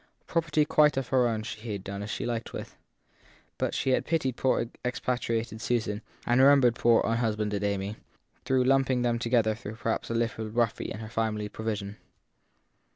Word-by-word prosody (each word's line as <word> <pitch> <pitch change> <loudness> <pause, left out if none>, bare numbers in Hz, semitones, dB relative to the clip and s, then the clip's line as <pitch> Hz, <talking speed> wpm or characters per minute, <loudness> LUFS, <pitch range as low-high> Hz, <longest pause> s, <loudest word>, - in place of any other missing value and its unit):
Property 155 -2 +1
quite 150 -2 +4
of 135 -2 -2
her 125 -2 +3
own 110 -2 -1
she 110 0 -6
had 100 -2 -5
done 100 0 -5
as 105 - -5
she - - -3
liked 115 -1 -3
with; - - -7 0.8
but - - -1
she 135 - +1
had - - +2
pitied 135 -7 0
poor 130 -2 +1 0.2
expa 125 +1 -1
triated 115 -1 -2
Susan 110 -4 -1 0.2
and 120 +1 +3
had - - +7
remembered 135 -4 +6
poor 120 -1 +4
unhusbanded 110 -3 0
Amy, 100 +1 -2 0.5
though 130 - +1
lumping 130 -1 +3
them 120 -1 +1
together 115 -2 +2
perhaps 110 0 -4
a 115 - -2
little 115 -1 -1
roughly 115 0 0
in 110 - -6
her 110 - -6
final 110 -1 -1
provision. 105 -2 -4
115 Hz, 175 wpm, -28 LUFS, 110-125 Hz, 0.8 s, had